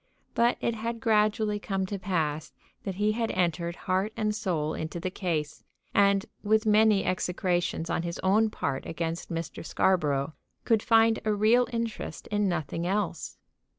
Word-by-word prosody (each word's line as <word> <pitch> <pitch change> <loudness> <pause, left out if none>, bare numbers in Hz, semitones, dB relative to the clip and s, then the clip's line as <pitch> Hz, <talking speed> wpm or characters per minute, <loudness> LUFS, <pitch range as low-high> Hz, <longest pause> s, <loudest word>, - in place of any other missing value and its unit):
But 235 +1 +3
it 235 - 0
had 230 +1 -4
gradually 215 -1 +2
come 195 -2 -2
to 200 +1 -4
pass 160 -6 -2 0.3
that 195 -2 -3
he 210 +2 +2
had 225 +1 -1
entered 170 -1 0
heart 190 +3 +1
and 215 -1 0
soul 170 -8 -1
into 160 +2 -4
the 185 +2 -3
case, 155 -6 -3 0.3
and, 200 -1 +4 0.2
with 220 +1 +2
many 215 -1 +4
execrations 180 -2 -1
on 165 - 0
his 170 0 -4
own 215 +4 +4
part 140 -9 -3
against 165 +1 -3
Mr. 165 -1 -5
Scarborough, 155 -5 +1 0.3
could 225 -2 +3
find 225 -1 +4
a 215 - +1
real 225 +4 +4
interest 230 -2 -4
in 205 -1 +2
nothing 170 0 -2
else. 190 -4 -2
195 Hz, 155 wpm, -28 LUFS, 170-215 Hz, 0.3 s, and